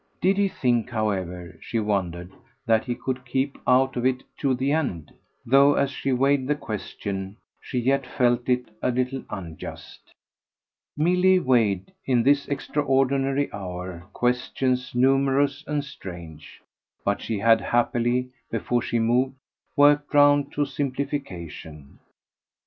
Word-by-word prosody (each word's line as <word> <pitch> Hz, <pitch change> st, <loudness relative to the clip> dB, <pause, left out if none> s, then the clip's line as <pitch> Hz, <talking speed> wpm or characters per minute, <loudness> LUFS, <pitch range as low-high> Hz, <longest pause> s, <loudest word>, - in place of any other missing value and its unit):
Did 190 Hz, +2 st, +2 dB
he 200 Hz, -, +4 dB
think, 125 Hz, -, 0 dB
however, 95 Hz, -6 st, -3 dB
she 115 Hz, -, -2 dB
wondered, 95 Hz, -4 st, -2 dB, 0.3 s
that 110 Hz, -2 st, +2 dB
he 120 Hz, -2 st, -2 dB
could 130 Hz, +1 st, -4 dB
keep 135 Hz, +1 st, -2 dB
out 130 Hz, +1 st, +4 dB
of 120 Hz, -, -2 dB
it 130 Hz, 0 st, +1 dB, 0.2 s
to 135 Hz, -3 st, +1 dB
the 135 Hz, +3 st, 0 dB
end? 130 Hz, -, -2 dB, 0.3 s
though 140 Hz, +3 st, +5 dB
as 140 Hz, 0 st, +1 dB
she 135 Hz, -, -2 dB
weighed 135 Hz, +1 st, +2 dB
the 150 Hz, -, +2 dB
question 100 Hz, -5 st, -5 dB, 0.2 s
she -, -, -6 dB
yet 135 Hz, +2 st, +1 dB
felt 120 Hz, -1 st, +1 dB
it 125 Hz, -3 st, 0 dB
a -, -, +1 dB
little 125 Hz, +1 st, -1 dB
unjust. 85 Hz, -6 st, -9 dB, 0.9 s
Milly 180 Hz, +4 st, +4 dB
weighed, 115 Hz, -, +1 dB
in 125 Hz, -3 st, +3 dB
this 140 Hz, +2 st, +3 dB
extraordinary 135 Hz, -1 st, 0 dB
hour, 90 Hz, -2 st, -6 dB
questions 125 Hz, +1 st, -1 dB
numerous 135 Hz, +2 st, +2 dB
and 150 Hz, -1 st, -1 dB
strange; 85 Hz, -, -10 dB, 0.4 s
but 100 Hz, 0 st, 0 dB
she 110 Hz, -, -2 dB
had 115 Hz, +2 st, +4 dB
happily, 120 Hz, +1 st, +1 dB, 0.2 s
before 120 Hz, -1 st, -1 dB
she 120 Hz, -, -1 dB
moved, 125 Hz, +4 st, +1 dB, 0.4 s
worked 145 Hz, 0 st, +4 dB
round 145 Hz, -1 st, +5 dB
to 145 Hz, -, +1 dB
a -, -, 0 dB
simplification. 95 Hz, -, -5 dB
125 Hz, 135 wpm, -25 LUFS, 110-140 Hz, 0.9 s, though